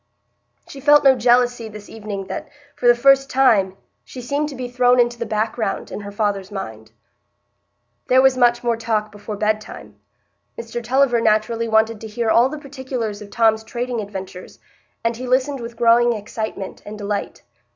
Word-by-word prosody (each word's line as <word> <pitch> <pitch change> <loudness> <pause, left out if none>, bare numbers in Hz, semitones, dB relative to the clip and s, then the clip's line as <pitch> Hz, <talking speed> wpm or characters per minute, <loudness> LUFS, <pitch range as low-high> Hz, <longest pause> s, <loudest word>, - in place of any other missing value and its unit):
She 275 - -10
felt 295 +1 +5
no 270 -1 +6
jealousy 245 -1 +2
this 210 -1 -11
evening 205 -3 -6
that, 300 +8 -6 0.3
for 245 - -1
the 240 - +7
first 270 +2 +4
time, 205 -8 +3 0.3
she 255 - -11
seemed 285 +4 -2
to 280 - -8
be 250 -1 -5
thrown 245 0 +3
into 240 -1 +2
the 235 - -3
background 220 -1 -2
in - - -5
her 205 -1 -8
father's 205 -2 -2
mind. 110 - -7 1.2
There 255 - +5
was 265 0 +5
much 240 -1 +3
more 235 -1 +1
talk 220 -2 -1
before 205 0 -7
bedtime. 215 +1 -3 0.6
Mr 235 +1 -6
Tulliver 250 0 +2
naturally 225 +1 +1
wanted 220 0 +2
to 220 - -7
hear 220 +1 -1
all 240 +3 +4
the 305 - -6
particulars 260 -7 -5
of 205 - -10
Tom's 220 0 +2
trading 240 +1 -3
adventures, 190 -2 -8 0.5
and 230 0 -1
he 255 +1 -6
listened 260 +2 +1
with 235 -1 -8
growing 235 +1 +4
excitement 210 -2 -6
and 210 +1 -8
delight. 205 -1 -4
230 Hz, 170 wpm, -20 LUFS, 210-250 Hz, 1.2 s, the